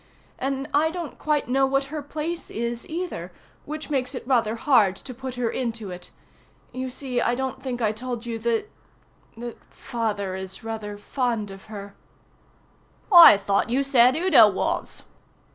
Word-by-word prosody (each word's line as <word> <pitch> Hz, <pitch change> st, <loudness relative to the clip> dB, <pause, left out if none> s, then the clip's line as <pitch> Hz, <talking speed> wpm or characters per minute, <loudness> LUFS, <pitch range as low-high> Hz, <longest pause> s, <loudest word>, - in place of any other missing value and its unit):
And 270 Hz, +1 st, -2 dB
I 300 Hz, +3 st, +3 dB
don't 335 Hz, -2 st, -6 dB
quite 300 Hz, -1 st, 0 dB
know 270 Hz, +2 st, +3 dB
what 275 Hz, +1 st, +1 dB
her 305 Hz, -, -3 dB
place 310 Hz, +4 st, -5 dB
is 235 Hz, +1 st, -4 dB
either, 320 Hz, -, -4 dB, 0.3 s
which 305 Hz, +1 st, -6 dB
makes 265 Hz, -1 st, -1 dB
it -, -, -6 dB
rather 235 Hz, -4 st, +2 dB
had 230 Hz, -7 st, +3 dB
to 255 Hz, -, -9 dB
put 260 Hz, +1 st, -7 dB
her 245 Hz, -1 st, -1 dB
into 225 Hz, -5 st, -3 dB
it. 180 Hz, 0 st, -8 dB, 0.6 s
You 255 Hz, 0 st, -4 dB
see, 250 Hz, -1 st, -3 dB
I 240 Hz, -, +1 dB
don't 260 Hz, 0 st, -4 dB
think 250 Hz, -2 st, -3 dB
I 215 Hz, -, +3 dB
told 240 Hz, +1 st, -5 dB
you 230 Hz, -1 st, -4 dB
that 235 Hz, -, -1 dB, 0.7 s
that 240 Hz, 0 st, -8 dB
Father 210 Hz, -5 st, -3 dB
is 190 Hz, +2 st, -7 dB
rather 220 Hz, -2 st, -5 dB
fond 230 Hz, -2 st, -2 dB
of 195 Hz, 0 st, -12 dB
her." 200 Hz, -2 st, -9 dB, 1.2 s
"I 340 Hz, -, +11 dB
thought 200 Hz, +3 st, 0 dB
you 265 Hz, +4 st, +1 dB
said 255 Hz, -2 st, +5 dB
Udo 310 Hz, -, +6 dB
was." 190 Hz, -, -3 dB
245 Hz, 160 wpm, -24 LUFS, 220-275 Hz, 1.2 s, I